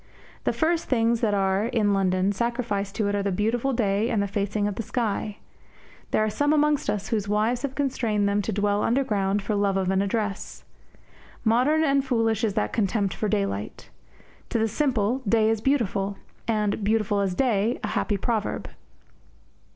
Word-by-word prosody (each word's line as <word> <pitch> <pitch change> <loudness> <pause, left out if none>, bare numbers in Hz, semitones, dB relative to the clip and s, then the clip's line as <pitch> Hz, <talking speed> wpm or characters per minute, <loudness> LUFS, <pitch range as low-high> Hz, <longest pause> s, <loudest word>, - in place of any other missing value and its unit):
The - - +3
first 330 +1 0
things 230 -2 +1
that 210 -3 +2
are, 195 +2 +1
in 220 -4 +1
London, 190 0 +2
sacrificed 210 -2 -2
to 215 - 0
it 205 - 0
are 205 - 0
the 200 0 -1
beautiful 225 +7 0
day 215 -2 +1
and 220 - +1
the 200 - 0
facing 205 +1 -1
of 205 - -2
the 210 - -4
sky. 215 -2 -2 0.7
There 215 - +2
are 215 - +1
some 290 +6 +1
amongst 300 -1 +2
us 205 -1 -2
whose 215 -4 -1
wives 215 +4 +1
have 275 -1 -4
constrained 230 -7 0
them 200 +1 +1
to 210 - -3
dwell 205 0 +1
underground 205 -6 +1
for 215 - -2
love 200 -1 +1
of 190 -1 0
an 190 0 +2
address. 205 0 -3 0.8
Modern 255 +8 +3
and 275 -2 +2
foolish 225 -4 0
is 215 -3 0
that 105 - -1
contempt 200 -2 0
for 215 - -2
daylight. 100 - -3 0.6
To - - 0
the 225 0 +2
simple, 245 -2 0
day 220 0 +4
is 225 -1 -1
beautiful; 205 -7 0 0.3
and 210 -2 0
"beautiful 215 -1 +1
as 195 -2 0
day" 230 -2 +1
a - - -1
happy 205 - 0
proverb. 220 +1 -2
215 Hz, 180 wpm, -25 LUFS, 200-235 Hz, 0.8 s, day